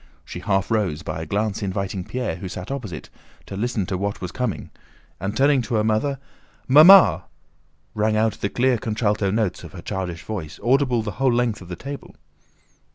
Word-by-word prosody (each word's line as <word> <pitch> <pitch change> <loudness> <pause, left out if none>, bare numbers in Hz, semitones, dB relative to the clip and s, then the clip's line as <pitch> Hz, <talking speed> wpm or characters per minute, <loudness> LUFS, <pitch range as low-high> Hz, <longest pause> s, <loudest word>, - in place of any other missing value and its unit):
She - - -7
half 95 +1 0
rose, 95 -9 0
by 80 0 -4
a 80 - -6
glance 105 +3 -1
inviting 95 -1 -3
Pierre, 125 -2 -3
who 95 0 -6
sat 90 +6 -7
opposite, 110 - -6 0.3
to - - -7
listen 110 -1 -1
to 90 0 -3
what 100 +1 -2
was 90 - -5
coming, 125 -5 -3 0.5
and 100 +4 -3
turning 140 0 +4
to 120 0 -3
her 105 - +2
mother: 110 +6 0 0.5
"Mamma!" 165 +8 +8 0.7
rang 110 0 +1
out 110 0 +2
the 100 - 0
clear 125 +1 +1
contralto 105 -2 0
notes 105 -2 -1
of - - -11
her - - -8
childish 90 -3 -4
voice, 90 -8 -6
audible 125 -2 +2
the 105 - -4
whole 135 -2 +4
length 120 -3 0
of 90 - -11
the 90 - -5
table. 140 +6 -8
110 Hz, 185 wpm, -23 LUFS, 95-125 Hz, 0.7 s, Mamma